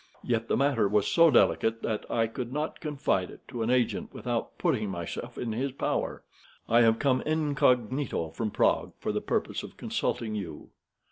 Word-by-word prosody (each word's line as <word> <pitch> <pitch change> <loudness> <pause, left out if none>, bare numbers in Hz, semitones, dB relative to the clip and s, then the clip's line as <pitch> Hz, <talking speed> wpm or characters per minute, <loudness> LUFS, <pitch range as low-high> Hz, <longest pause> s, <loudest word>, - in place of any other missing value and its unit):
Yet 115 -1 0
the - - +1
matter 135 -6 +3
was 105 0 +2
so 165 -1 +5
delicate 115 -4 +3
that 110 -2 -2
I 115 - +2
could 120 +2 -5
not 150 +3 -3
confide 145 - -1
it - - -14
to 120 -3 -4
an 110 - 0
agent 125 -2 +1
without - - -3
putting 105 -1 0
myself 85 -3 -5
in 120 - -3
his 130 +5 -1
power. 135 - -2 0.4
I 115 +1 +5
have 115 -1 +5
come 130 -1 +2
incognito 135 - +1
from 110 +6 -2
Prague - - +1
for - - -2
the - - -1
purpose - - -1
of - - -11
consulting 110 -2 -2
you." 100 -6 -6
115 Hz, 180 wpm, -28 LUFS, 110-135 Hz, 0.4 s, so